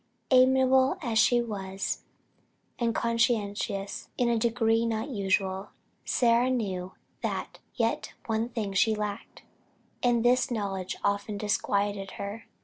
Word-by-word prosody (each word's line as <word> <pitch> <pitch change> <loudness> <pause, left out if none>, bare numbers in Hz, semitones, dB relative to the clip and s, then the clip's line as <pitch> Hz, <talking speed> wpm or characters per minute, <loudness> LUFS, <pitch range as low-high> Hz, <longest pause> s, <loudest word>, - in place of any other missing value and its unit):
Amiable 260 +1 +5
as 230 -4 +1
she 240 +1 +4
was, 195 -4 -3 0.8
and 235 -2 0
conscientious 210 -4 -1
in 245 -1 +2
a 235 -1 +2
degree 225 0 +2
not 225 +3 -1
usual, 195 -3 0 0.4
Sarah 240 +1 +3
knew 190 -7 -2 0.3
that - - -3 0.2
"yet - - -1
one 225 +1 -1
thing 220 -5 -3
she 215 +3 +3
lacked;" 210 0 -5 0.6
and 240 -1 +2
this 250 +1 +4
knowledge 195 -5 -3
often 200 +1 0
disquieted 200 -1 -1
her. 200 +3 -6
220 Hz, 120 wpm, -28 LUFS, 200-240 Hz, 0.8 s, Amiable